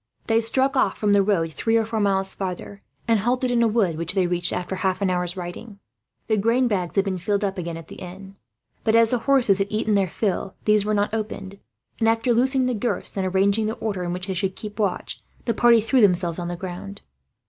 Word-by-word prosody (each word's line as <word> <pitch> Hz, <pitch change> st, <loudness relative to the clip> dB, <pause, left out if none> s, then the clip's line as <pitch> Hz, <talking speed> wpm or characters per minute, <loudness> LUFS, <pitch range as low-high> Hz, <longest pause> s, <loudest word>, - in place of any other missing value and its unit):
They 225 Hz, 0 st, +2 dB
struck 265 Hz, +4 st, +1 dB
off 210 Hz, -7 st, +2 dB
from 205 Hz, -1 st, +2 dB
the 200 Hz, -, +5 dB
road, 175 Hz, -5 st, 0 dB
three 225 Hz, +6 st, +1 dB
or 225 Hz, -, +1 dB
four 225 Hz, 0 st, -2 dB
miles 195 Hz, -2 st, +1 dB
farther; 195 Hz, +1 st, -6 dB, 0.3 s
and 225 Hz, -2 st, +3 dB
halted 250 Hz, +4 st, 0 dB
in 240 Hz, -1 st, +2 dB
a 230 Hz, -, +4 dB
wood 210 Hz, -8 st, +1 dB
which 170 Hz, +3 st, -3 dB
they 190 Hz, -2 st, +3 dB
reached, 175 Hz, 0 st, -1 dB
after 180 Hz, +1 st, -3 dB
half 185 Hz, 0 st, 0 dB
an 195 Hz, -2 st, +1 dB
hour's 180 Hz, 0 st, -2 dB
riding. 185 Hz, +4 st, -7 dB, 0.5 s
The 220 Hz, -, +1 dB
grain 230 Hz, +5 st, +2 dB
bags 185 Hz, -6 st, -2 dB
had 195 Hz, -1 st, +2 dB
been 190 Hz, -2 st, -2 dB
filled 200 Hz, +4 st, -1 dB
up 195 Hz, -1 st, -2 dB
again, 170 Hz, -1 st, -4 dB
at 165 Hz, -1 st, -10 dB
the -, -, -11 dB
inn; 190 Hz, +2 st, -10 dB, 0.5 s
but 220 Hz, 0 st, +2 dB
as 230 Hz, -1 st, +5 dB
the 250 Hz, -, +1 dB
horses 235 Hz, -5 st, +3 dB
had 195 Hz, -, +1 dB
eaten 215 Hz, 0 st, 0 dB
their 195 Hz, -2 st, +2 dB
fill, 195 Hz, 0 st, -2 dB
these 210 Hz, -1 st, +3 dB
were 215 Hz, 0 st, +1 dB
not 205 Hz, +1 st, 0 dB
opened 200 Hz, -3 st, -5 dB, 0.4 s
and, 225 Hz, -1 st, +3 dB
after 230 Hz, +2 st, +2 dB
loosening 260 Hz, +2 st, +2 dB
the 250 Hz, -, 0 dB
girths 235 Hz, +2 st, -3 dB
and 190 Hz, -1 st, -1 dB
arranging 200 Hz, +3 st, +2 dB
the 220 Hz, -, -2 dB
order 205 Hz, -4 st, -3 dB
in 175 Hz, -, -3 dB
which 180 Hz, +1 st, -3 dB
they 190 Hz, -, -3 dB
should 190 Hz, +1 st, -2 dB
keep 210 Hz, 0 st, -8 dB
watch, 200 Hz, -4 st, -2 dB, 0.2 s
the 230 Hz, -, +1 dB
party 235 Hz, -1 st, +5 dB
threw 245 Hz, +4 st, +2 dB
themselves 180 Hz, -4 st, +2 dB
on 175 Hz, -, -3 dB
the 175 Hz, -, -3 dB
ground. 185 Hz, +2 st, -7 dB
200 Hz, 235 wpm, -23 LUFS, 185-225 Hz, 0.5 s, the